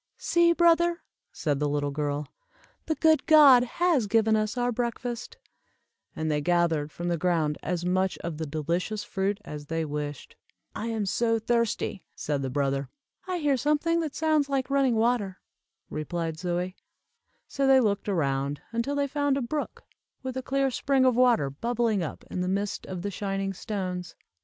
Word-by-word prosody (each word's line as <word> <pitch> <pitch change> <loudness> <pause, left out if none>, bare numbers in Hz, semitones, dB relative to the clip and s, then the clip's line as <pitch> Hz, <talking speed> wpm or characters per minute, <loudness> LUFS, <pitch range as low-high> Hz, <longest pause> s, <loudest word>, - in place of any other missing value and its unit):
"See, 340 0 +3
brother," 340 0 +3 0.3
said 145 -4 -1
the 145 0 0
little 145 0 -1
girl, 145 0 -2 0.6
"the 315 - +1
good 315 -1 +3
God 285 -6 +8
has 290 -2 +1
given 220 +1 +3
us 215 +2 -1
our 245 0 +1
breakfast;" 240 - -4 0.8
and 155 0 -1
they 150 0 0
gathered 165 -2 +1
from 175 - -5
the 170 -2 0
ground 160 -4 +1
as 175 +1 -2
much 185 +1 +1
of 165 -2 -4
the 160 - -3
delicious 170 +8 -2
fruit 195 0 -2
as 145 -1 -7
they 165 +1 -1
wished. 145 -1 -5 0.4
"I 220 - -4
am 220 -3 -1
so 230 +3 +1
thirsty," 230 -3 -1
said 145 -2 -2
the 135 - -2
brother. 135 0 -1 0.4
"I 365 -1 -1
hear 290 -5 +1
something 300 +5 +1
that 315 -3 -3
sounds 310 -3 +2
like 275 -1 -1
running 270 -4 +3
water," 220 -4 +1 0.5
replied 160 +1 -4
Zoie. 180 +1 -2 0.7
So 275 -1 0
they 265 0 +7
looked 205 -4 0
around, 140 -5 0
until 235 +5 -1
they 285 0 +1
found 285 0 0
a - - -1
brook, 290 +5 -4 0.4
with 260 -1 -4
a 260 - -2
clear 270 +1 0
spring 270 +1 +2
of 255 -2 +4
water 240 - +3
bubbling 230 - 0
up 160 - -5
in 180 - -2
the 180 - -1
midst 200 +2 -2
of 180 -2 -5
the 205 - -2
shining 195 0 -2
stones. 185 -4 -4
205 Hz, 170 wpm, -27 LUFS, 165-260 Hz, 0.8 s, God